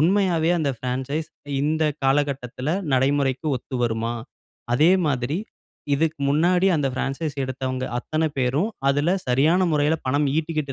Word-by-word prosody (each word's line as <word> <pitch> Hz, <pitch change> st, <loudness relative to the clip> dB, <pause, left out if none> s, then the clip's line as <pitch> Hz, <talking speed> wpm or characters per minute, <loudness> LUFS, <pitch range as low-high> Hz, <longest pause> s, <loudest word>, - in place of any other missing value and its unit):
உண்மையாவே 175 Hz, -1 st, +2 dB
அந்த 145 Hz, -3 st, +1 dB
பிரான்சைஸ் 135 Hz, +5 st, -3 dB, 0.3 s
இந்த 155 Hz, +2 st, +1 dB, 0.2 s
காலகட்டத்துல 135 Hz, -1 st, 0 dB, 0.2 s
நடைமுறைக்கு 135 Hz, +2 st, +1 dB
ஒத்து 130 Hz, -, -9 dB
வருமா? 115 Hz, 0 st, 0 dB, 0.6 s
அதே 155 Hz, +8 st, +5 dB, 0.2 s
மாதிரி, 140 Hz, +3 st, 0 dB, 0.6 s
இதுக்கு 160 Hz, +1 st, 0 dB
முன்னாடி, 175 Hz, +6 st, +3 dB
அந்த 145 Hz, -3 st, 0 dB
பிரான்சைஸ் 140 Hz, +3 st, -3 dB
எடுத்தவங்க 130 Hz, 0 st, -3 dB
அத்தனை 155 Hz, +4 st, -1 dB
பேரும், 135 Hz, -, +1 dB, 0.2 s
அதுல 145 Hz, +5 st, +1 dB, 0.2 s
சரியான 155 Hz, +9 st, +3 dB
முறைல 150 Hz, +2 st, +2 dB
பணம் 145 Hz, +3 st, +2 dB
ஈட்டிக்கிட்டு 155 Hz, -3 st, -2 dB
145 Hz, 125 wpm, -23 LUFS, 130-160 Hz, 0.6 s, அதே